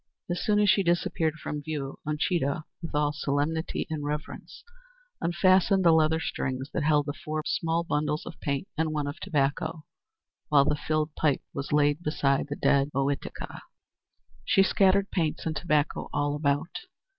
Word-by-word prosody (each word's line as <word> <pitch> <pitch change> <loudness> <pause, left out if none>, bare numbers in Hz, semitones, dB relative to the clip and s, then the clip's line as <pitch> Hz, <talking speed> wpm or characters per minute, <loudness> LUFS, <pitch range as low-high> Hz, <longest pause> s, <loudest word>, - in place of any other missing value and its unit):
As 175 - -2
soon 210 -1 +2
as 210 - +4
she 195 - +5
disappeared 170 -3 +1
from 150 -1 -5
view, 145 -2 -5
Uncheedah, 150 -1 0 0.2
with 165 -3 -6
all 150 0 +2
solemnity 145 +3 -1
and 155 -2 -4
reverence, 150 +1 -5 0.6
unfastened 185 +2 +3
the 170 - +7
leather 160 0 +3
strings 130 -3 -3
that 175 - 0
held 150 -1 +3
the 145 - -3
four 155 +1 -4
small 165 +1 0
bundles 150 -2 -1
of 170 - -9
paints 140 +7 -3
and 155 0 0
one 150 -1 -1
of 145 +1 -5
tobacco, 155 +2 -1 0.6
while 140 -2 +5
the - - +2
filled 155 +1 -1
pipe 150 -3 +1
was 140 0 -5
laid 145 +1 +3
beside 140 -4 +1
the 145 - -3
dead 140 -1 +2
Ohitika. 140 +1 -3 0.8
She 195 - +4
scattered 195 +1 +3
paints 160 -5 -1
and 160 -1 -1
tobacco 150 -4 0
all 145 0 0
about. 145 +2 -1
155 Hz, 160 wpm, -27 LUFS, 145-165 Hz, 0.8 s, the